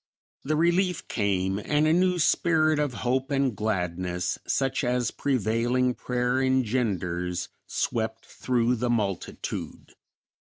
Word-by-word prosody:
The 155 +3 0
relief 175 +2 +1
came 95 -2 0
and 150 +1 +2
a 155 - +4
new 180 +1 +3
spirit 155 -2 +3
of 145 -2 +1
hope 130 +2 +1
and 135 -4 +1
gladness, 90 -3 -2
such 135 0 0
as 125 -1 0
prevailing 125 0 +1
prayer 125 +1 -1
engenders, 105 -9 0 0.2
swept 110 0 -2
through 125 -1 0
the 120 +2 -1
multitude. 105 -6 -3
125 Hz, 115 wpm, -26 LUFS, 105-140 Hz, 0.2 s, a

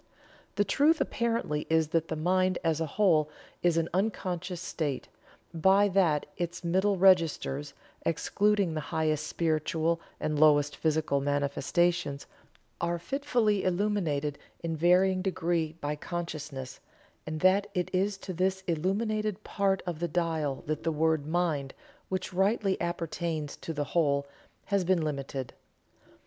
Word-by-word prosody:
The 205 - +3
truth 295 - +3
apparently 230 -11 -1
is 160 -1 +2
that 165 0 +1
the 160 - -3
mind 185 +3 +2
as 165 -1 +1
a 160 - 0
whole 155 -3 +3 0.3
is 175 -2 +2
an 165 0 +1
unconscious 185 -3 -2
state, 155 -7 -3 0.5
by 190 +5 +4
that 175 -6 +2
its 175 0 -4
middle 190 +3 +2
registers, 165 -6 +3 0.3
excluding 195 +3 +1
the 155 - -2
highest 155 -1 -1
spiritual 165 +1 0 0.2
and 155 -1 -1
lowest 145 -1 +5
physical 155 -3 +1
manifestations, 145 +2 0 0.6
are 170 0 0
fitfully 230 - 0
illuminated 175 -7 0 0.2
in 165 -1 -2
varying 185 +3 +4
degree 170 -4 -1
by 150 -2 -3
consciousness; 150 -5 -6 0.5
and 155 0 -4
that 195 +2 +4
it 180 -1 -1
is 195 +2 +1
to 190 -1 -6
this 190 +2 0
illuminated 210 +5 -1
part 195 -2 0
of 175 -4 -4
the 175 - 0
dial 160 -4 -1
that 155 0 -2
the 165 - 0
word 160 -1 +1
"mind," 155 -5 -1 0.3
which 185 0 -3
rightly 195 +1 +2
appertains 165 -3 -3
to - - -6
the 145 -2 -2
whole, 140 -2 +1 0.4
has 200 -2 +1
been 180 -2 +2
limited." 140 -3 -4
170 Hz, 135 wpm, -29 LUFS, 155-190 Hz, 0.6 s, lowest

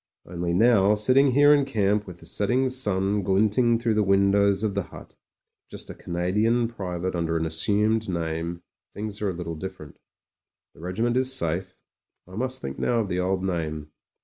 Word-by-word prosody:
Only 85 0 -3
now, 105 -1 +4
sitting 130 +6 +4
here 145 +2 +6
in 145 -1 +3
camp 105 -5 0
with 90 - -10
the - - -13
setting 125 +6 0
sun 105 -5 0
glinting 105 +5 +2
through 115 -1 0
the 105 - +2
windows 100 0 +3
of 105 -2 0
the 100 - -1
hut, - - -12 0.6
just - - -8
a - - -7
Ca - - -15
nadian 105 +7 +1
private 95 -5 -4
under 85 -1 -1
an 80 - -1
assumed 105 +7 +1
name, 85 0 -3 0.3
things 105 0 -6
are 105 - 0
a 90 - -4
little 85 -1 -5
different 80 -3 -9 0.7
The - - -19
regiment 110 +8 -1
is 130 0 0
safe; 85 -8 -2 0.5
I 90 - -12
must 130 +4 -3
think 65 0 -5
now 120 -1 +1
of 105 - -4
the 90 - -1
old 95 +1 -1
name. 80 -5 -3
100 Hz, 180 wpm, -25 LUFS, 90-115 Hz, 0.7 s, here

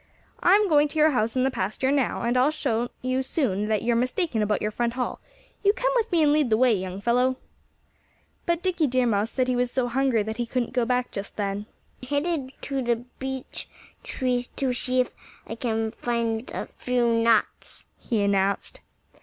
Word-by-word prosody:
"I'm 405 +3 +5
going 300 -3 +4
to 305 - -6
your 310 0 +5
house 230 -3 0
in 255 - +2
the 265 - +2
pasture 215 +6 -1
now; 280 -3 0
and 240 +1 +1
I'll 255 +4 +4
soon 240 -6 -1 0.3
show 265 +1 0
you 205 +2 -2
that 215 -2 0
you're 235 0 +2
mistaken 250 - 0
about 210 0 +1
your 210 - -2
front 235 +1 -1
hall.... 250 0 -3 0.4
You 405 0 +5
come - - 0
with 465 -3 +1
me 335 -3 +4
and 295 -1 +4
lead 300 -4 +2
the 220 - +3
way, 250 0 +4
young 190 -1 -3
fellow!" 250 +3 +2 1.1
But 340 0 0
Dickie 350 -5 +1
Deer 255 -1 +2
Mouse 215 -1 +1
said 255 0 0
he 255 - +1
was 245 0 +1
so 245 0 0
hungry 255 -3 +2
that 220 +1 -5
he 240 -1 -2
couldn't 240 -1 -2
go 245 -1 +2
back 250 0 0
just 200 0 -6
then. 205 0 -3 0.3
"I'm 255 - -9
headed 285 -2 -1
for 275 -1 -2
the 240 -1 +2
big 235 +2 -11
beech 265 -1 -5 0.3
tree 250 -1 -1
to 265 -2 0
see 255 +1 +2
if 250 - -3 0.3
I - - -6
can 225 -1 -1
find 235 0 -2
a - - -4
few 250 -1 -1
nuts," 230 -1 +1
he 220 -5 -1
announced. 200 0 0
250 Hz, 205 wpm, -25 LUFS, 225-270 Hz, 1.1 s, I'm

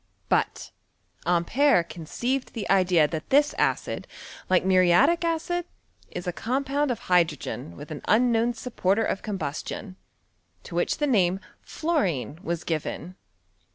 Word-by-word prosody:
But - - 0 0.6
Ampere 180 +5 +3
conceived 240 - -3
the 225 -4 -4
idea 180 -5 +4
that 155 0 -5
this 290 +2 +4
acid, - - 0 0.4
like 185 0 +3
muriatic 190 - +4
acid, 335 +1 -1 0.4
is 175 - -6
a 180 - -2
com 255 +9 -1
pound 285 +1 0
of 245 - -2
hydrogen 160 - 0
with 150 - -9
an 150 - -6
unknown 235 +1 +3
supporter 225 -3 0
of - - -2
combustion, 190 0 -5 0.7
to - - -10
which - - 0
the 295 - +1
name 190 -8 +2 0.3
^worine 180 - -1
was 170 -4 -3
given. 165 +2 -4
195 Hz, 130 wpm, -26 LUFS, 175-265 Hz, 0.7 s, idea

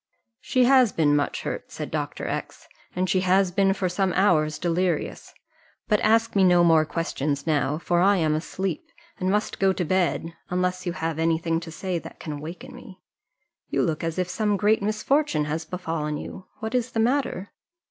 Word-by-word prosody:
"She 255 0 +1
has 255 -3 +5
been 150 -4 +2
much 145 -1 -1
hurt," - - -5
said - - -6
Dr. - - -3
X, - - -5 0.3
"and 185 +1 0
she 185 - +2
has 185 0 +3
been 195 +1 +3
for 190 -1 -1
some 185 +1 0
hours 155 -6 +2
delirious; 175 -1 -1 0.6
but 210 -2 +3
ask 225 0 +2
me 195 - +4
no 180 -1 +5
more 165 -2 +5
questions 145 -3 -2
now, 150 -2 +1
for 175 +1 0
I 200 +2 +4
am 155 -3 +1
asleep, 190 - -3 0.3
and 185 - 0
must 210 +2 -1
go 195 -1 +4
to 180 - -2
bed, 170 -1 0 0.2
unless 180 0 -1
you 175 - -1
have 165 -2 -3
any 165 0 +2
thing 165 0 -1
to 170 0 -9
say 180 +1 -3
that - - -12
can 150 -2 -6
waken 180 - -8
me: 220 -6 -13 0.7
you - - +1
look 160 -1 -1
as 165 0 -2
if 180 -1 0
some 205 +2 0
great 210 +2 +2
misfortune 215 - +1
had 155 +2 -3
befallen 165 -4 -3
you; 185 +5 -9
what 220 0 -4
is 250 -1 -1
the 225 - -1
matter?" 240 -5 0
180 Hz, 190 wpm, -25 LUFS, 165-205 Hz, 0.7 s, has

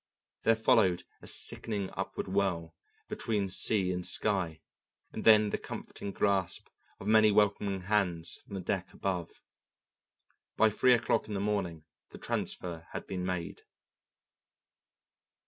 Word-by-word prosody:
There 115 - +4
followed 90 -5 +3 0.2
a - - -10
sickening 100 -4 -2
upward - - -4
whirl 95 -4 -1 0.3
between 105 -4 -2
sea 95 0 +2
and 90 0 -3
sky, 90 -6 -1 0.5
and - - -5
then 110 -2 +7
the - - -1
comforting 100 - -7
grasp 95 -3 0 0.3
of - - -9
many 110 0 +6
welcoming 100 -1 +2
hands 90 -4 +1
from 100 - -10
the 95 - -3
deck 90 0 -2
above. 90 -4 -4 1.1
By 110 -1 +5
three 125 +4 +5
o'clock 120 - 0
in 105 - -4
the - - -1
morning 95 -6 -2 0.2
the - - -11
transfer 85 -2 -3
had - - -5
been 95 -2 -4
made. 90 -2 -3
95 Hz, 130 wpm, -31 LUFS, 90-105 Hz, 1.1 s, then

